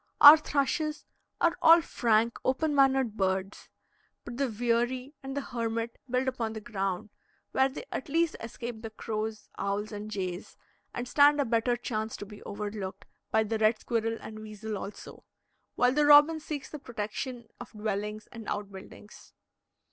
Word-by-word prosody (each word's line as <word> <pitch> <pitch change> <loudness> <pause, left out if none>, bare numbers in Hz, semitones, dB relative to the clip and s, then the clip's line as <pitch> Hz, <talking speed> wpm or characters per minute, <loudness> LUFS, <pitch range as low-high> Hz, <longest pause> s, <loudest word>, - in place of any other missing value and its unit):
Our 290 +1 +12
thrushes 305 +1 -1 0.3
are 340 +1 +3
all 330 +1 +8
frank, 230 -7 +1
open 295 +4 +1
mannered 270 -5 +3
birds; 190 0 -2 0.6
but 240 0 -7
the 275 0 +1
veery 240 +4 -1
and 270 0 -6
the - - 0
hermit 230 -2 -3
build 255 +2 0
upon 235 -4 -2
the 220 - -5
ground, 200 -1 -3 0.4
where 265 0 +3
they 265 - -7
at 265 - -4
least 330 +2 +1
escape 230 0 -6
the 225 - -6
crows, 215 0 -4
owls, 200 +2 -2
and 210 0 -6
jays, 185 -3 -5 0.3
and 245 +1 -5
stand 290 +2 +5
a 285 - +2
better 235 +1 +1
chance 220 -2 -3
to - - -7
be 205 0 -12
overlooked, 205 -2 -6 0.2
by 220 - +3
the 220 +1 -2
red 215 +1 +4
squirrel 225 -1 -1
and 215 0 -8
weasel 215 0 -6
also; 200 +1 -8 0.5
while 250 0 +3
the 295 +1 +3
robin 295 +2 +7
seeks 300 -2 -5
the 300 - -8
protection 235 0 -5
of 245 - -9
dwellings 210 0 -3
and 230 -2 -9
out 205 -1 -3
buildings. 195 +2 -13
230 Hz, 165 wpm, -29 LUFS, 215-265 Hz, 0.6 s, Our